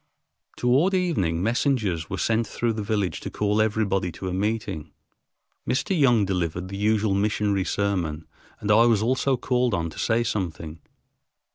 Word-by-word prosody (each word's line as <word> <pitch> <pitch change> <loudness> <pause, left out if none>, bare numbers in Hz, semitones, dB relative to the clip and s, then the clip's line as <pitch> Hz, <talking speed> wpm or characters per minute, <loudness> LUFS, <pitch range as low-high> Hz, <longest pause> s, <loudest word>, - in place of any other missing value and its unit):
Toward 140 +11 +3
evening 95 - 0
messengers 110 - 0
were - - -3
sent 115 0 +1
through 115 +1 -1
the 110 - -4
village 105 -3 -1
to - - -6
call 105 +1 0
everybody 100 -4 0
to 95 - -6
a - - -4
meeting. 100 -5 -2 0.8
Mr. 185 +9 0
Young 125 - +4
delivered 90 -1 -2
the 100 - -6
usual 105 0 +1
missionary 100 -1 0
sermon 90 -6 -1 0.3
and 105 - -1
I 115 +3 +6
also 125 +6 0
was - - -11
called 125 -4 +1
on 85 -1 -2
to - - -10
say 115 +1 +1
something. 85 -7 -4
105 Hz, 155 wpm, -25 LUFS, 95-115 Hz, 0.8 s, I